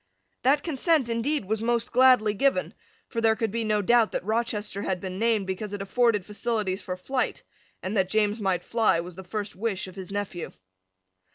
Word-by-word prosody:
That 280 +3 +3
consent, 310 -3 +1
indeed, 230 +2 0
was 220 +2 -1
most 235 0 0
gladly 250 -4 +5
given: 275 +5 +1 0.3
for 230 - -3
there 225 -1 +4
could 220 -1 -1
be 230 +1 -1
no 210 -1 +1
doubt 235 +1 +4
that - - -2
Rochester 215 -2 -1
had 190 -2 -1
been 185 +1 -5
named 225 -3 +2
because 190 +2 -4
it 205 - -4
afforded 220 -2 +2
facilities 210 -3 -2
for 185 0 -5
flight; 255 +7 -2 0.4
and 190 +4 -3
that 190 -2 +2
James 215 +1 +1
might 190 -4 0
fly 225 -7 +2
was 175 +1 -6
the 190 - -9
first 205 +3 -5
wish 205 -1 -2
of 185 - -10
his 190 0 -7
nephew. 200 -4 -4
215 Hz, 190 wpm, -26 LUFS, 195-235 Hz, 0.4 s, gladly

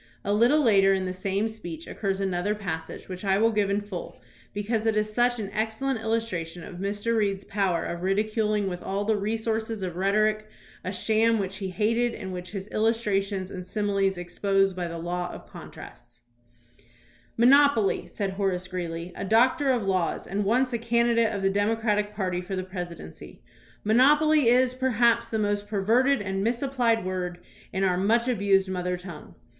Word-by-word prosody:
A 200 - +1
little 240 +8 +4
later 195 -6 +5
in 190 -1 -2
the 185 - -3
same 195 +3 -1
speech 175 -8 -8
occurs 195 -2 -3
another 195 +1 -1
pas 185 -6 -4
sage - - -10
which 185 0 -7
I 195 -1 +2
will 225 +2 +3
give 210 -2 +1
in 200 +1 +1
full 205 -4 -7 0.3
because 215 +2 -2
it 220 - +2
is 215 0 0
such 245 +1 +2
an 200 -2 -5
ex 220 +1 -1
cellent 270 -1 -2
illustration 205 -7 -2
of 180 - -9
Mr. 205 +4 -1
Reed's 200 -3 0
power 195 -5 0
of 170 0 -4
ridiculing 210 +2 0
with 180 -2 -4
all 200 +1 -2
the 220 0 +2
resources 220 0 -2
of 180 -2 -4
rhetoric 215 +2 +1 0.3
a 185 - -3
sham 220 +3 +2
which 195 -2 -3
he 195 -2 -4
hated 230 +6 0
and 190 -2 -6
which 180 0 -6
his 195 -1 -6
illustrations 205 -4 0
and 185 -1 -6
similes 200 -2 0
exposed 195 +2 0
by 180 -1 -3
the 170 0 -6
law 175 +1 -3
of - - -11
contrasts: 120 0 -12 1.2
"Monopoly," 255 -3 +4
said 200 -2 -3
Horace 190 -2 -1
Greeley, 175 -1 -5
a - - -5
doctor 255 - +3
of 245 -4 +2
laws, 185 -3 0
and 200 +3 -2
once 250 +4 +2
a 235 - 0
candidate 235 0 +2
of 200 -1 -4
the 195 - +3
Democratic 210 0 0
party 185 -3 -1
for 190 +2 -5
the 185 - -2
presidency, 175 - -8 0.2
" - - -29
mon 215 +2 +2
opoly 300 +2 +5
is, 250 +2 +4
perhaps, 245 -3 +2
the 220 - -1
most 205 -1 -1
perverted 225 +5 +2
and 195 0 -2
misapplied 240 -2 +1
word 180 -1 -3 0.3
in 190 - -1
our 180 -2 +2
much 230 +6 +2
abused 200 -5 +2
mother 180 -1 -2
tongue." 175 -4 -10
205 Hz, 180 wpm, -26 LUFS, 185-225 Hz, 1.2 s, later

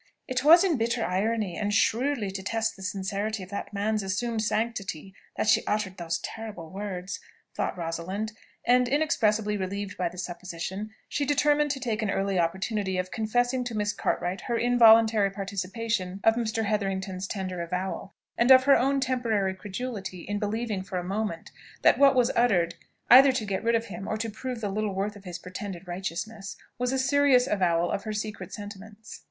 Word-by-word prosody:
"It 255 -1 -1
was 335 +4 +8
in 350 -7 +2
bitter 235 0 0
irony, 200 0 0
and 205 0 -1
shrewdly 230 +1 +1
to 190 0 -5
test 225 +3 -1
the 195 - -13
sincerity 195 +2 -3
of 185 - -11
that 200 - -5
man's 210 +1 0
assumed 215 +4 -1
sanctity, 210 -5 -2 0.2
that - - 0
she - - +4
uttered 210 -3 -1
those 170 0 -2
terrible 210 -8 -7
words," 190 -1 -5 0.3
thought - - -2
Rosalind; 180 +6 -3 0.3
and 250 0 +4
inexpressibly 220 -7 +1
relieved 200 +1 -4
by 180 -2 0
the 180 - -13
supposition, 180 +3 -5 0.2
she 290 - -1
determined 295 +1 +3
to 275 -1 -2
take 230 -3 -2
an 215 - -1
early 195 -1 0
opportunity 190 +3 -1
of 185 0 -2
confessing 245 +3 0
to 240 -2 -4
Miss 210 0 0
Cartwright 180 +2 -1
her 235 - -1
involuntary 225 -3 +6
participation 195 0 -3
of 225 - +6
Mr. 225 -1 -1
Hetherington's 195 -2 -2
tender 185 -4 -4
avowal, 180 +3 -4 0.2
and 235 +2 +4
of 260 -1 +9
her 275 +1 +6
own 275 +2 +2
temporary 230 -7 0
credulity 195 -2 -6
in 205 +4 -3
believing 215 -1 -2
for 190 -1 -5
a 180 - -2
moment 195 -2 -3 0.3
that - - +5
what 275 -1 +6
was 250 -2 +3
uttered, 185 -8 +3 0.4
either 265 +2 +10
to 230 -4 -2
get 195 -1 -2
rid 230 0 +3
of 230 0 0
him 195 -2 -7
or 215 - -1
to 225 0 -3
prove 250 +2 -5
the 205 - -1
little 205 0 -2
worth 205 +2 -2
of 200 -1 -14
his 175 -1 -5
pretended 185 0 -7
righteousness, 195 +3 -5 0.2
was 250 0 0
a 265 - 0
serious 265 -1 +4
avowal 175 -4 +1
of 195 - -2
her 215 - -3
secret 215 0 -5
sentiments. 205 +1 -9
210 Hz, 180 wpm, -27 LUFS, 190-230 Hz, 0.4 s, either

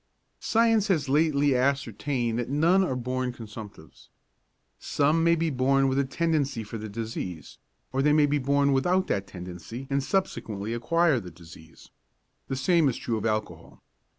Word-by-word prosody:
Science 225 -2 +2
has 160 -8 +1
lately 145 -1 +3
ascertained 125 -2 0
that 120 - -3
none 165 +7 +3
are 155 -8 -1
born 125 0 -2
consumptives. 105 -7 -11 0.7
Some 150 +3 +1
may 170 0 +4
be 165 -1 -1
born 135 +1 +2
with 135 +1 +1
a - - +3
tendency 140 -4 -1
for 110 +1 -7
the 110 0 -6
disease, 100 -6 -6 0.3
or 135 - +1
they 150 +2 +3
may 150 0 +5
be 145 0 +1
born 140 +1 +2
without 180 +8 +2
that 100 0 -1
tendency 90 +8 -8
and 140 0 +1
subsequently 115 - -2
acquire 155 +4 +2
the 90 -5 -9
disease. 80 -2 -15 0.6
The 135 - -2
same 150 +3 +3
is 120 - -3
true 115 -2 -2
of 110 - -2
alcohol. 105 -7 -4
135 Hz, 160 wpm, -26 LUFS, 110-150 Hz, 0.7 s, may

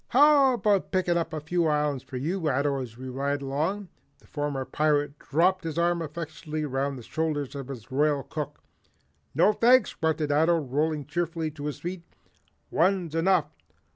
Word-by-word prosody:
How 280 -1 +6
about 205 -4 +1
picking 180 -2 +1
up 170 -1 -1
a 155 - -3
few 165 +3 0
islands 150 -3 +1
for 130 - -7
you, 160 +4 -1
Ato, 140 0 +1
as 115 -3 -8
we 130 +1 -7
ride 140 +2 -2
along?" 165 +9 -2 0.3
The - - -25
former 145 -3 -3
pirate 145 -1 0
dropped 180 +5 +2
his 160 -1 -4
arm 170 0 +2
affectionately 155 -1 -5
round 135 0 -2
the 120 - -9
shoulders 150 -1 -2
of 140 -3 -6
his 130 -3 -9
Royal 145 0 +2
Cook. 150 -2 -6 0.7
"No, 210 - +5
thanks," 245 +1 +4
grunted 155 -2 0
Ato, 160 +4 +4
rolling 150 +1 -1
cheerfully 165 +1 -2
to 145 -1 -8
his 150 - -4
feet. 175 +1 -4 0.7
"One's 175 -1 +1
enough. 170 0 +2
155 Hz, 170 wpm, -27 LUFS, 145-170 Hz, 0.7 s, How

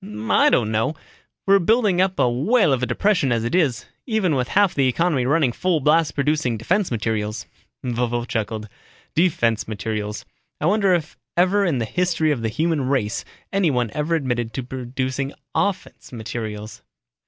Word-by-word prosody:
"I - - +5
don't 110 -2 +2
know. 110 +8 0 0.5
We're 195 0 +5
building 205 -1 +3
up 190 0 +1
to - - +2
a 125 - +2
whale 160 - +3
of 130 - 0
a 125 - 0
depression 185 -10 +1
as 115 -1 +1
it 115 - -2
is, 145 -11 +1 0.2
even 215 -8 +1
with 125 -2 0
half 200 -2 +3
the 135 -2 +2
economy 135 -1 +1
running 145 -2 +3
full 175 +6 0
blast 155 +3 +2
producing 145 -4 0
defense 185 - 0
materials." 110 -1 -2 0.4
Vovo 120 -1 -1
chuckled, 110 -1 -3 0.5
"Defense 120 - +1
materials. 105 -1 -4 0.3
I - - -2
wonder 195 0 +3
if 160 -7 -4 0.2
ever 190 +3 +3
in 165 -7 +1
the 115 - -1
history 170 +1 0
of 135 -6 -1
the 115 - -1
human 155 +1 0
race 120 -6 0 0.3
anyone 140 - +1
ever 150 +3 0
admitted 120 -6 -2
to 130 - -3
producing 130 +2 -3 0.2
offense 200 -3 -2
materials." 110 -2 -6
135 Hz, 165 wpm, -22 LUFS, 115-175 Hz, 0.5 s, I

